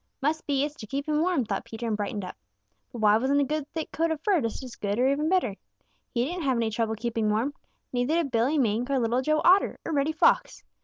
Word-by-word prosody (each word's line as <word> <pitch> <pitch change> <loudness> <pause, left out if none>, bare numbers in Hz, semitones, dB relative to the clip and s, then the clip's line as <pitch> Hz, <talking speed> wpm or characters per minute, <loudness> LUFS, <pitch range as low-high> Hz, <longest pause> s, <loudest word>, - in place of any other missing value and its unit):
"Must 310 +3 -1
be 280 -1 +1
it's 295 - -6
to 215 - -9
keep 275 +5 -3
him 305 0 +1
warm," 340 -8 +1
thought - - -3
Peter 225 +1 -7
and 220 - 0
brightened 205 -1 -3
up. 180 - -8 0.6
But 235 - -7
why 210 0 +5
wasn't 270 +4 +2
a - - +4
good 295 +1 -2
thick 320 -1 -4
coat 330 +1 0
of 320 -2 -2
fur 370 -2 +2
just 230 +3 -3
as 250 -2 -8
good 205 0 -2
or 250 +2 +3
even 290 +3 +1
better? 355 - +1 0.6
He 240 0 0
didn't 350 +5 -4
have 265 -5 +1
any 225 -1 0
trouble 220 0 -1
keeping 225 -1 -1
warm. 225 +7 0 0.4
Neither 245 +5 +1
did 330 -5 0
Billy 250 +7 +2
Mink 240 -1 +1
or 275 - +2
Little 240 +1 +1
Joe 310 +3 +1
Otter 375 +3 +5
or - - -3
Reddy 285 +1 +1
Fox. 315 - +2
265 Hz, 250 wpm, -27 LUFS, 225-305 Hz, 0.6 s, why